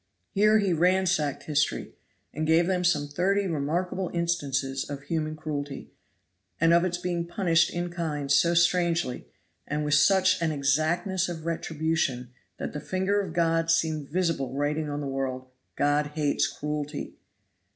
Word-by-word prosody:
Here 215 +2 +4
he 200 -4 +1
ransacked 180 -3 +1
history, 145 -1 -1 0.4
and 155 +1 -2
gave 165 +2 +4
them 180 0 0
some 150 -5 +2
thirty 190 +7 +1
remarkable 175 +3 -1
instances 140 -6 -1
of 140 -1 -6
human 155 +1 -2
cruelty, 145 -3 -5 0.7
and 165 +1 +4
of 170 0 +5
its 175 -1 -1
being 175 -1 -2
punished 175 -2 +2
in 175 0 -3
kind 150 -5 -3
so 170 +5 +4
strangely, 170 -5 +1 0.4
and 150 +1 -2
with 150 - 0
such 185 +5 +4
an 165 -1 +1
exactness 155 +6 0
of 165 -2 -6
retribution, 160 -6 -1 0.3
that - - -5
the 150 - -4
finger 190 +5 0
of 185 -5 -6
God 165 -1 +1
seemed 160 -3 +1
visible 165 -6 -1
writing 150 +2 -1
on 145 0 -3
the - - -4
world 135 -1 -3 0.3
"God 145 +1 +2
hates 150 -2 +1
cruelty." 150 0 -4
160 Hz, 150 wpm, -27 LUFS, 145-175 Hz, 0.7 s, of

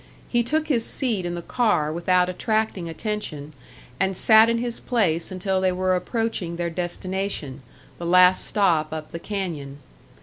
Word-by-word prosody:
He 240 - +2
took 310 +6 -1
his 245 -7 +1
seat 225 -9 0
in 175 - -3
the 170 - -6
car 205 -12 +1
without 180 +2 +2
attracting 215 -2 -1
attention, 165 -6 -5 0.5
and 190 -1 +1
sat 220 0 +7
in 230 - +1
his 235 0 -3
place 185 -10 0
until 190 0 -1
they 185 -1 +2
were 185 0 +1
approaching 190 -3 -2
their 170 0 -3
destination, 175 -4 -4 0.4
the 170 - -4
last 180 +1 +5
stop 170 -7 +1
up 155 -1 -6
the 170 - -6
canyon. 165 -9 -5
185 Hz, 160 wpm, -23 LUFS, 170-220 Hz, 0.5 s, sat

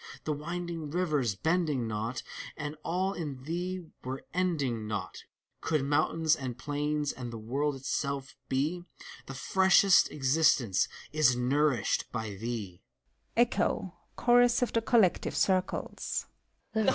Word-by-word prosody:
The 155 - -1
winding 165 +1 -4
rivers 150 - 0
bending 155 - 0
not, 110 +3 -3 0.3
And 150 0 -4
all 185 +3 0
in 145 -8 -5
thee 180 +4 -3 0.2
were 130 +1 -5
ending 145 -12 0
not, 100 -3 -5 0.4
Could 155 -3 0
mountains, 155 +2 +2
and 130 -4 -5
plains, 150 +1 -1
and 125 -2 -7
the 115 - -6
world 135 +7 -1
itself, 140 +1 -3
bef 155 +7 0 0.4
Thr 135 - -6
freshest 190 +5 +5
existence 135 - +3 0.3
is 150 -5 +4
nourished 125 -2 +1
by 110 -3 -3
thee! 100 -3 -5
145 Hz, 100 wpm, -30 LUFS, 125-160 Hz, 0.4 s, freshest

